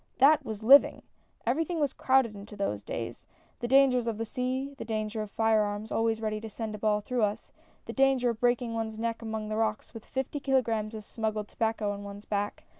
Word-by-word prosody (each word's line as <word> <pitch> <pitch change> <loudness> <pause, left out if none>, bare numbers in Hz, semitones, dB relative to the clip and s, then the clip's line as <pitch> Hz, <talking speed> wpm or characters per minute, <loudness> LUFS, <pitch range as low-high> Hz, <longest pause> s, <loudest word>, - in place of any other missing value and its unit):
" - - -41
That 305 -1 +3
was 220 -3 -6
living 275 +5 +7 0.4
I 235 - +3
Everything 325 +5 -1
was 290 -2 +1
crowded 260 -4 +2
into 205 +1 -10
those 105 - -2
days! - - -6 0.3
The 240 - -2
dangers 255 -2 +4
of 225 -2 -1
the 225 - -2
sea 260 +3 -2
— - - -21
the - - -3
danger 215 0 -2
of 215 - -5
fire 225 0 +3
arms 205 +1 -3
always 225 0 +1
ready 215 -1 -2
to 225 - -6
send 220 0 -5
a 210 - -6
ball 210 0 +1
through 245 +3 -2
us 210 +1 -1 0.2
— - - -35
the - - -6
danger 270 -3 +3
of 225 - -8
breaking 240 -1 +1
one's 220 -1 -3
neck 230 +1 -2
among 220 -1 -4
the 215 - -2
rocks 220 0 -1
with 225 -2 -9
fifty 265 +2 -3
kilograms 230 -6 0
of 215 - -7
smuggled 215 -1 -3
tobacco 220 -2 -1
on 200 0 -6
one's 200 +1 -9
back. 205 0 -2
225 Hz, 230 wpm, -29 LUFS, 215-250 Hz, 0.4 s, living